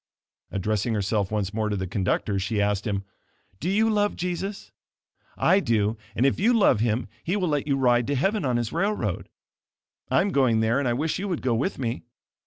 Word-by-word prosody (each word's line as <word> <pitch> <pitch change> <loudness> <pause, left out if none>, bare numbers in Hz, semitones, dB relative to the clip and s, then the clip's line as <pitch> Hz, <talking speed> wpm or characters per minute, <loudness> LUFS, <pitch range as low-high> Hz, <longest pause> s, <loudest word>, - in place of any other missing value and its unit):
Addressing 105 +3 -1
herself 100 -1 0
once 105 -2 -2
more 110 0 -1
to 105 - -1
the 95 -1 -2
conductor, 95 +2 -1
she 105 +3 -1
asked 100 +1 0
him, 100 -2 -1 0.6
"Do 175 - -2
you 215 +3 +3
love 205 -1 +1
Jesus? 180 +3 -4 0.7
I 190 - +4
do, 115 - +1 0.2
and 125 - +2
if 135 - +2
you 225 +6 +4
love 200 - +4
Him, 115 +1 0 0.2
He 180 - -1
will 185 -4 0
let 145 -1 -1
you 140 -2 +1
ride 120 -2 +3
to 145 - 0
heaven 195 - +1
on 125 -3 +1
His 120 -2 -2
railroad. 200 +5 -1 0.8
I - - +4
am 200 - 0
going 130 -7 +3
there 110 +4 +2
and 140 - 0
I 120 - +2
wish 155 +8 -1
you 200 - -3
would 175 -5 -3
go 125 -2 +2
with 135 - -1
me. 120 -2 -3
125 Hz, 205 wpm, -25 LUFS, 105-180 Hz, 0.8 s, I